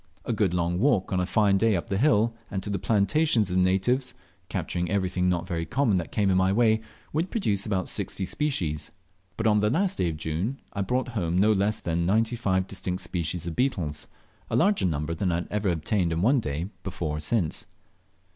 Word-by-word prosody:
A - - -1
good 105 -4 +1
long 85 0 0
walk 105 -7 +2
on 95 - +2
a 90 - 0
fine 100 -2 +3
day 110 0 +3
up 85 - -2
the 95 - +1
hill, 115 -4 +3 0.2
and 95 -2 -3
to 105 - -4
the 100 - -1
plantations 110 - +2
of 90 - +1
the - - +4
natives, 95 +8 +1 0.3
capturing 85 -1 -2
everything 95 -2 +1
not 85 -1 0
very 85 -3 -2
common 110 - +1
that 85 - -4
came 100 -3 +2
in 95 - +3
my 95 0 +3
way, 110 +1 +3 0.3
would 165 +5 0
produce 105 - -1
about 95 -3 -1
60 95 - -2
species; 90 - -1 0.5
but 115 - -2
on 105 -1 +4
the 105 +1 +2
last 180 - 0
day 90 -2 +2
of 80 - -4
June 80 - -2
I 100 - -2
brought 125 +6 -1
home 90 -7 -1
no 105 +3 +5
less 105 +2 0
than 85 0 -1
95 110 -2 +1
distinct 95 -2 -4
kinds 85 -1 -2
of 85 -2 -4
beetles, 90 - -1 0.4
a - - -1
larger 200 - +3
number 75 0 -2
than 90 +2 -1
I 85 +1 -1
ever 105 -2 0
obtained 85 +2 0
in 85 +2 0
one 130 +5 +4
day 80 0 -3
before 85 -5 -3
or - - -4
since. 85 0 -1
95 Hz, 210 wpm, -26 LUFS, 85-110 Hz, 0.5 s, no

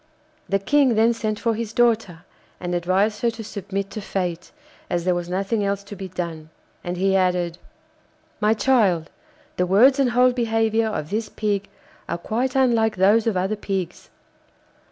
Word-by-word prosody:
The 195 - +3
King 260 +4 +3
then 225 +2 +4
sent 215 -2 -2
for 230 -2 +1
his 225 0 -4
daughter, 225 -8 +1 0.3
and 175 -1 -4
advised 190 +5 +1
her 235 - +2
to 225 -1 -7
submit 200 -1 -5
to 215 - -5
fate, 180 -3 -3 0.4
as 175 -1 -1
there 180 - +3
was 175 0 -3
nothing 195 +4 -1
else 200 0 -1
to 200 +1 -9
be 190 0 -6
done. 170 -3 -6 0.3
And 175 0 -4
he 195 +1 +2
added: 180 -2 +1 0.8
'My 215 +1 +3
child, 205 - +2 0.5
the 180 - +1
words 250 +9 +5
and 270 -2 +3
whole 250 +1 +4
behaviour 225 -2 +1
of 155 -7 -4
this 215 0 -2
Pig 205 -2 -2 0.4
are - - -1
quite 240 +8 -2
unlike 230 -4 +3
those 205 +5 +3
of 215 -5 +1
other 190 +4 0
pigs. 195 -4 -4
205 Hz, 170 wpm, -22 LUFS, 180-225 Hz, 0.8 s, words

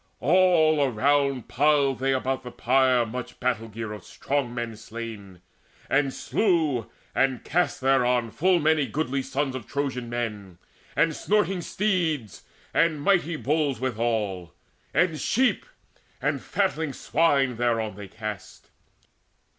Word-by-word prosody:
All 160 -1 +4
around 140 +1 +1
Piled 140 -1 +2
they 135 +1 +1
about 130 0 -1
the 125 - -8
pyre 125 0 +2
much 125 +2 -7
battle 125 -3 -1
gear 110 0 -6
Of 105 -4 -9
strong 140 +2 -2
men 120 -2 -4
slain; 110 -4 -8 0.5
and 135 0 +2
slew 155 - 0 0.2
and 135 -2 +1
cast 175 -5 0
thereon 125 -3 +2
Full 180 - +3
many 155 -2 +2
goodly 140 -3 -1
sons 135 0 -2
of 130 -4 -7
Trojan 130 -4 -3
men, 105 -6 -4 0.4
And 155 0 +2
snorting 195 -3 +1
steeds, 165 - -1 0.3
and 165 -2 +2
mighty 170 0 +2
bulls 150 -4 0
withal, 110 -8 -2 0.4
And 165 -4 +1
sheep 250 - +1 0.5
and - - -1
fatling 160 -7 -1
swine 135 -3 +1
thereon 115 -3 0
they 100 0 -9
cast. 105 0 -8
135 Hz, 125 wpm, -25 LUFS, 115-155 Hz, 0.5 s, All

